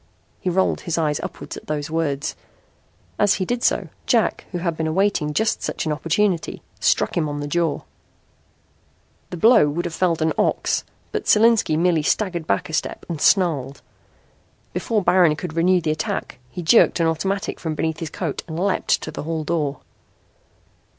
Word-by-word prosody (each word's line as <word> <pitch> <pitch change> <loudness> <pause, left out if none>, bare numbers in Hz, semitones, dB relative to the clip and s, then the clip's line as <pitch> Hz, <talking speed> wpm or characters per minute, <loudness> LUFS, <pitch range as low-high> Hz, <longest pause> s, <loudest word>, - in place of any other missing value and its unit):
He 185 - -2
rolled 185 +2 +1
his 170 -2 -2
eyes 150 -3 0
upward - - -7
at - - -11
those 150 0 -3
words. 150 -3 -1 0.8
As 205 -1 +4
he 185 - -2
did 240 +4 -2
so, - - +1 0.2
Jack, - - +1
who 180 - -3
had 170 -2 -2
been 160 0 -2
awaiting 175 -2 +1
just 220 +8 0
such - - -3
an 155 - -1
opportunity, 165 +4 0 0.2
struck - - +2
him 155 -3 0
on 145 0 -4
the 145 - -4
jaw. 165 0 0 1.5
The 180 - -6
blow 220 -5 +6
would 165 +4 -2
have 170 - -4
felled 170 -2 +1
an 160 - +1
ox - - +1 0.3
but - - -3
Solinski 215 -7 +4
merely 170 -1 +2
staggered 175 0 -1
back 100 - 0
a 160 - -9
step - - -2
and 160 -3 -4
snarled. 145 -8 +2 0.9
Before 215 -4 0
Baron 175 -4 +4
could 160 +1 -6
renew 180 +2 +3
the 160 -2 0
attack 155 -4 -3
he 180 - -6
jerked 180 +2 +5
an 165 - +3
automatic 190 +5 -1
from 160 -2 -3
beneath 160 0 -2
his 165 - -4
coat 160 -1 -4
and 160 0 -5
leaped 195 +1 +1
to - - -5
the - - -6
hall 160 +1 -3
door. 150 -4 -2
165 Hz, 175 wpm, -22 LUFS, 155-185 Hz, 1.5 s, blow